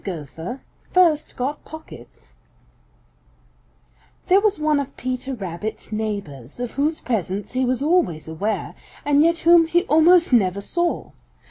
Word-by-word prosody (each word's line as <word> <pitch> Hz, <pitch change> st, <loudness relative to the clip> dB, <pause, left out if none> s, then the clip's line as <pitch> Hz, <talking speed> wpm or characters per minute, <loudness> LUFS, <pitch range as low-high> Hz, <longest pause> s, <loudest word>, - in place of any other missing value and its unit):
GOPHER 170 Hz, -, -6 dB, 0.3 s
FIRST 330 Hz, -5 st, +2 dB
GOT 275 Hz, +4 st, -3 dB
POCKETS 120 Hz, -, -13 dB, 1.9 s
|THERE 380 Hz, +2 st, +4 dB
was 420 Hz, -1 st, +1 dB
one 305 Hz, -1 st, +1 dB
of 280 Hz, -, -6 dB
Peter 255 Hz, +1 st, -4 dB
Rabbit's 195 Hz, +1 st, -6 dB
neighbors 200 Hz, -, -5 dB
of 245 Hz, -1 st, -3 dB
whose 300 Hz, +4 st, -1 dB
presence 205 Hz, -3 st, -3 dB
he 255 Hz, +1 st, 0 dB
was 255 Hz, +2 st, -1 dB
always 295 Hz, -, +1 dB
aware, 195 Hz, +7 st, -3 dB, 0.3 s
and 290 Hz, 0 st, +4 dB
yet 335 Hz, +2 st, +3 dB
whom 335 Hz, -1 st, +7 dB
he 345 Hz, +2 st, +2 dB
almost 335 Hz, -2 st, +4 dB
never 195 Hz, -4 st, +3 dB
saw. 345 Hz, +12 st, -2 dB
255 Hz, 130 wpm, -22 LUFS, 200-320 Hz, 1.9 s, whom